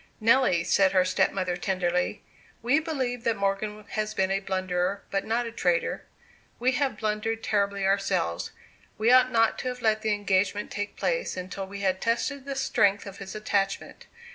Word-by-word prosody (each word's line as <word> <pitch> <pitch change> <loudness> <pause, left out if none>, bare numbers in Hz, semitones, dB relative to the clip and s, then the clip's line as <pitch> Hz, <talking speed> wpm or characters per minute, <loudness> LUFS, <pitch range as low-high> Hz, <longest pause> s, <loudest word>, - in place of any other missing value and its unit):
"Nelly," 225 -6 +4
said 195 -1 +3
her 185 -1 +4
stepmother, 185 0 +1
tenderly, 180 +1 -1 0.4
"we 255 +6 +3
believe 260 -7 -3
that 230 - +1
Morgan 205 +2 -2
has 215 0 -2
been 190 0 +1
a 195 - +1
blunderer, 185 0 -1
but 195 - -1
not 235 +2 0
a 230 - -5
traitor. 175 -6 0 0.5
We 250 +2 +2
have 260 -4 0
blundered 220 +1 -2
terribly 200 -1 0
ourselves. 195 - 0 0.5
We 220 +3 +3
ought 255 0 +6
not 225 -1 +3
to - - -4
have 250 -1 -5
let 220 -1 +2
the 215 -1 +1
engagement 205 0 0
take 205 0 -4
place - - -1
until 185 +1 -5
we 200 +1 -7
had 190 -1 0
tested 260 +4 -1
the 275 -1 -4
strength 205 -6 +2
of 195 -1 -9
his 195 0 -8
attachment. 200 -2 -2
205 Hz, 170 wpm, -27 LUFS, 190-230 Hz, 0.5 s, ought